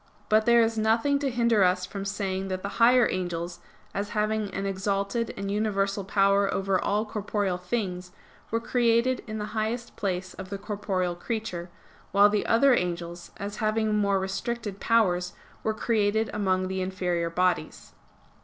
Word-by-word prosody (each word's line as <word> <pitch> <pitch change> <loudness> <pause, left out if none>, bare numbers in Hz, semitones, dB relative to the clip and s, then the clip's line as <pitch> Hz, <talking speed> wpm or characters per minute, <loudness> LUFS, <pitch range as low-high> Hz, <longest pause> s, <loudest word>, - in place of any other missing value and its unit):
But 215 +1 +3
there 235 -1 +6
is 225 0 0
nothing 230 +6 +2
to 280 -1 0
hinder 235 -4 +3
us 180 0 +2
from 195 +1 -6
saying 195 -1 -2
that 185 -1 -4
the 200 +3 -5
higher 245 0 +6
angels, 175 -1 -3 0.3
as 205 +1 -2
having 215 -1 0
an 195 +1 -3
exalted 200 +4 -1
and 195 0 -3
universal 200 -1 0
power 200 0 +3
over 195 -1 0
all 210 +2 +1
corporeal 205 -3 -2
things, 180 -2 -3 0.4
were 230 - 0
created 235 +1 +2
in 215 0 -4
the 210 - -3
highest 230 +2 -2
place 185 -2 -3
of 190 - -9
the 200 - -4
corporeal 195 -3 -2
creature; 180 -2 -4 0.4
while 200 +1 +7
the 210 0 0
other 255 +4 +5
angels, 175 -3 -2
as 205 0 -5
having 215 -1 +1
more 200 -2 +2
restricted 205 +2 -3
powers, 180 -6 +2 0.3
were 220 - 0
created 220 0 +1
among 185 -2 +1
the 190 0 -2
inferior 180 -2 -1
bodies. 175 -2 -1
200 Hz, 160 wpm, -27 LUFS, 185-220 Hz, 0.4 s, while